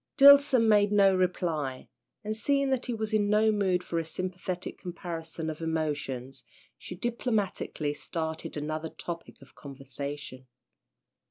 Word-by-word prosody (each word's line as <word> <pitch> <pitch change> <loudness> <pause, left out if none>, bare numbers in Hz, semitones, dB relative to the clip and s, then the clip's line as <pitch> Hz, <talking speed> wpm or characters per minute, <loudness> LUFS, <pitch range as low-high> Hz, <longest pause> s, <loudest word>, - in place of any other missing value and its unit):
Dillson 280 -4 +8
made 205 -1 +4
no 195 -2 +5
reply, 165 -7 -1 0.4
and 215 +1 -2
seeing 275 +4 +1
that 260 -1 0
he 245 - -1
was 220 0 -3
in 205 -1 +2
no 215 +1 +4
mood 190 -4 +1
for 170 - -2
a - - -1
sympathetic 185 +2 -5
comparison 165 -2 -6
of 155 0 -5
emotions, 145 -5 -3 0.3
she 180 - -8
diplomatically 210 - -1
started 160 +2 -4
another 155 +2 -3
topic 170 +1 -7
of 135 - -19
conversation. 140 -1 -8
175 Hz, 135 wpm, -29 LUFS, 155-210 Hz, 0.4 s, Dillson